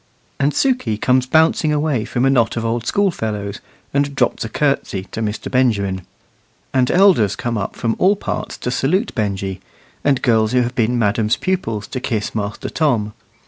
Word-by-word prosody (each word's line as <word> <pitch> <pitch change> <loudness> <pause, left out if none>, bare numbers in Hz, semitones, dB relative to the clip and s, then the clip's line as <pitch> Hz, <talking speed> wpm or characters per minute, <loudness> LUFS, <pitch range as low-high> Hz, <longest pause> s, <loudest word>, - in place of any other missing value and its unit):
And 140 +1 +2
Sukey 245 - +1
comes 125 +1 +2
bouncing 160 +1 +3
away 150 -6 0
from 125 +1 0
a - - +4
knot 120 -3 +2
of 115 - -2
old 115 +1 -2
school 200 -1 +2
fellows, 105 -6 -4 0.3
and 140 0 0
drops 125 -3 +1
a 115 - -5
curtsey 135 -8 0
to 115 - -4
Mr. 105 -1 -3
Benjamin. 100 -8 +1 0.7
And 130 -1 +2
elders 175 - +4
come 120 -1 -3
up 100 -3 -3
from 115 -1 -1
all 195 +3 +4
parts - - -4
to 125 - -3
salute 180 - 0
Benjy, 95 -3 -2 0.4
and 140 -3 +2
girls 110 -1 +2
who 125 -1 +4
have 120 +1 -3
been 120 0 +1
madam's 110 0 +2
pupils 115 - -2
to 130 - -3
kiss 110 -4 -2
Master 105 -1 -3
Tom. 115 -10 0
120 Hz, 180 wpm, -19 LUFS, 105-140 Hz, 0.7 s, a